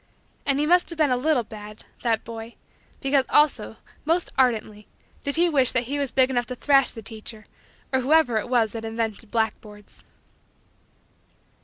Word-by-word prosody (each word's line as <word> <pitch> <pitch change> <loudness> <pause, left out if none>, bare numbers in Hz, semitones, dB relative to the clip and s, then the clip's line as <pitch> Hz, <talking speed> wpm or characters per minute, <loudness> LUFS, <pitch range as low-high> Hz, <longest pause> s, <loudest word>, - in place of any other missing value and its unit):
And 275 -1 +2
he 300 - +2
must 355 +3 +3
have 335 - -2
been 305 -4 +3
a - - +3
little 255 -2 +1
had 210 0 -10 0.2
that 230 -2 0
boy 230 0 -8 0.5
because 275 0 +2
also, 280 -8 +2 0.3
most 335 +3 0
ardently, 220 -5 0 0.4
did 280 - -2
he 345 +2 +4
wish 275 -6 +3
that 255 - +1
he 280 +4 -3
was 280 -2 -1
big 260 +1 +2
enough 245 -2 0
to 250 - -5
thrash 275 +1 +3
the 225 - -9
teacher 220 0 -9 0.5
or 260 - +3
whoever 275 -3 +3
it 230 - -6
was 235 -4 +2
that 225 -1 -6
invented 225 -1 -4
blackboards. 210 -2 -4
245 Hz, 170 wpm, -24 LUFS, 225-280 Hz, 0.5 s, he